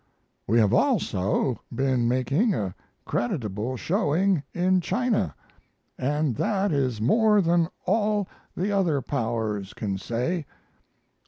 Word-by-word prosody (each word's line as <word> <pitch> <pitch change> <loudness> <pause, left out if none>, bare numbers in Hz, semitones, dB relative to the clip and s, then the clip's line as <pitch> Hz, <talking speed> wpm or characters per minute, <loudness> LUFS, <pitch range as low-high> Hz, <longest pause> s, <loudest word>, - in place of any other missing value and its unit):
We 115 - +3
have 105 -4 +4
also 125 - +1
been 130 -3 +1
making 135 - +1
a 95 -3 -2 0.3
creditable 120 0 -2
showing 185 - +1
in 185 +1 +2
China, 245 +4 0 0.6
and 145 -1 0
that 205 -1 +1
is 130 -6 0
more 210 - +4
than 170 -2 +2 0.2
all 210 -1 +1 0.3
the 195 +4 0
other 170 -9 +1
powers 110 -6 -2
can 100 -3 -3
say. 130 - -2
145 Hz, 110 wpm, -26 LUFS, 120-195 Hz, 0.6 s, have